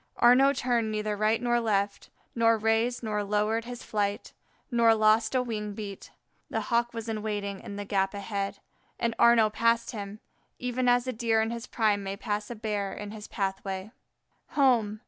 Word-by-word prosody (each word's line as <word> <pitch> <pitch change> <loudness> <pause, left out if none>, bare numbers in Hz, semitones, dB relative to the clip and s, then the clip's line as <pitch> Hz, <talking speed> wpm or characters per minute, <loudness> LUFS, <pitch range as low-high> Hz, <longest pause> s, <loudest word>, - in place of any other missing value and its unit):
Arnaux 260 +3 +6
turned 240 -4 0
neither 215 0 -1
right 215 +2 +2
nor 240 -1 +1
left, 200 -3 -1 0.2
nor 230 -1 +3
raised 225 +3 +1
nor 210 -2 -1
lowered 210 +3 0
his 245 0 -7
flight, 205 -1 -2 0.4
nor 230 -1 +5
lost 220 +2 +3
a 255 - +3
wing 210 -3 -4
beat. 200 -2 -7 0.4
The - - -1
Hawk 235 0 +2
was 230 -1 -6
in 220 -1 -3
waiting 205 -2 -3
in 200 - -8
the 205 0 -5
gap 195 0 0
ahead, 200 0 -3 0.4
and 230 -1 0
Arnaux 230 -2 +6
passed 230 +1 +2
him, 205 -1 -7 0.4
even 250 0 0
as 245 0 +3
a 255 - -2
Deer 225 -1 +1
in 220 +1 0
his 235 +1 -6
prime 210 -3 +1
may 195 0 -5
pass 210 +1 -3
by - - -5
a - - -11
Bear 210 -3 -2
in 205 0 -7
his 210 -1 -9
pathway. 195 0 -3 0.7
Home! 230 -7 +3
220 Hz, 185 wpm, -28 LUFS, 205-235 Hz, 0.7 s, Arnaux